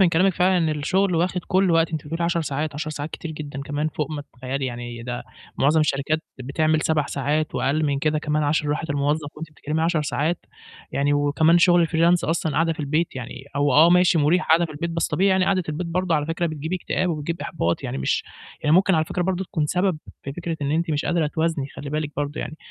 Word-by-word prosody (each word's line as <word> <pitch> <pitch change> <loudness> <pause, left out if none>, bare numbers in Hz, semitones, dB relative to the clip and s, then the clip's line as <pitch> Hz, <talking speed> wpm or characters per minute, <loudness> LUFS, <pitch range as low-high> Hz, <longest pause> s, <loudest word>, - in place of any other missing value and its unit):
من 190 - +6
كلامِك 180 +3 +3
فعلًا 180 +1 +3
إن 165 -2 +1
الشُغل 175 +6 +1
واخِد 180 +2 +1
كل 190 0 +3
وقتِك، 165 -1 +3
أنتِ 155 -2 -3
بتقولي 165 +3 -2
10 170 0 +1
ساعات، 150 -1 -2
10 155 +1 -3
ساعات 150 0 -5
كتير 165 - -6
جدًا 145 -3 -6
كمان 145 +2 -2
فوق 150 -1 -3
ما 150 -2 -4
تتخيّلي، 130 0 -4
يعني 120 -1 -6
ده 125 0 -4 0.4
معظم 150 +3 +4
الشركات 150 +1 +1 0.2
بتعمل 155 +4 +1
7 155 -2 +1
ساعات 150 +3 -1
وأقل 155 +3 +1
من 140 -2 +1
كده 155 +2 +1
كمان 150 0 0
عشان 150 0 +1
راحة 150 +2 -2
الموظف 145 +1 0
وأنتِ 160 +1 -7
بتتكلِّمي 155 +1 -3
10 165 -2 +1
ساعات، 150 +3 -1 0.5
يعني 140 +1 +1
وكمان 145 +4 +3
شُغل 175 -1 +5
الfreelance 170 +1 +3
أصلًا 160 -1 0
قاعدة 165 +2 +2
في 160 - -7
البيت 155 +2 -1
يعني 130 +1 -7
هو 145 -1 +2
آه، 160 +6 +7
ماشي 180 -2 +5
مُريح 160 +5 +2
قاعدة 165 +2 +5
في 165 - -6
البيت، 170 +3 -3
بس 165 -1 0
طبيعي 195 +2 +2
يعني 190 -1 +3
قعدة 190 -1 +2
البيت 155 +3 -3
برضه 175 0 0
على 150 -1 0
فكرة 165 +2 -1
بتجيب 155 +1 -5
اكتئاب 185 0 -1
وبتجيب 165 +1 -3
إحباط، 85 - -1
يعني - - -4
مش 65 - 0 0.4
يعني 150 - +3
ممكن 190 +1 +4
على 160 -1 +2
فكرة 180 - -2
برضه 190 +1 -1
تكون 155 -4 -1
سبب 180 +1 +1 0.2
في 135 - -5
فكرة 170 +1 -4
إن 140 - -1
أنتِ 165 +2 0
مش 150 -1 0
قادرة 170 -3 +1
توازني، 160 -2 -1
خلّي 140 - -6
بالِك 150 0 -2
برضه 145 +1 -2
يعني. 155 - -6
155 Hz, 225 wpm, -23 LUFS, 145-170 Hz, 0.5 s, آه